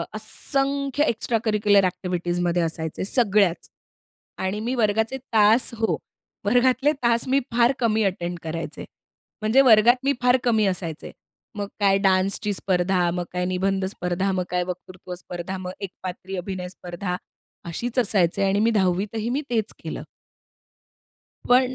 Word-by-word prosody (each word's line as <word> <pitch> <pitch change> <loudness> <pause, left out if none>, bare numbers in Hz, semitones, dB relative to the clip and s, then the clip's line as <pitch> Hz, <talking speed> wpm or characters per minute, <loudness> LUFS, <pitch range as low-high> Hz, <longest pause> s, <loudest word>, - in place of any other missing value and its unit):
असंख्य 275 +1 0
एक्स्ट्राकरिक्युलर 215 -3 +2
एक्टिव्हिटीजमध्ये 175 -1 -1
असायचे. 160 +1 -3
सगळ्याच. 205 -6 +2 0.7
आणि 190 +3 -2
मी 240 +4 -2
वर्गाचे 220 +2 +1 0.2
तास 220 +2 +5
हो, 225 0 0 0.5
वर्गातले 255 +5 +3
तास 235 +1 +2
मी 270 +2 +3
फार 235 +2 +4
कमी 220 -2 +2
अटेंड 175 -2 -2
करायचे. 165 +1 -5 0.6
म्हणजे 220 +5 +4
वर्गात 240 -1 +6
मी 280 +1 +2
फार 250 +1 +4
कमी 220 -3 +3
असायचे. 175 -4 -3 0.4
मग 205 -1 -3
काय 195 -1 +4
डान्सची 195 +1 +1
स्पर्धा, 180 -2 +1
मग 180 -1 -2
काय 180 0 -1
निबंध 190 +1 0
स्पर्धा, 185 0 -2
मग 185 -1 0
काय 180 0 0
वक्तृत्व 180 0 -7
स्पर्धा, 175 +1 -6
मग 185 -1 -6
एकपात्री 185 0 -7
अभिनय 180 0 -4
स्पर्धा. 180 0 -5 0.5
अशीच 235 +9 -2
असायचे 195 -5 +2
आणि 195 +1 +2
मी 225 +2 +3
10 195 0 0
ही 225 +1 -2
मी 275 +5 0
तेच 220 -3 -1
केलं. - - -5 1.5
पण 255 +1 +4
200 Hz, 135 wpm, -24 LUFS, 180-230 Hz, 1.5 s, वर्गात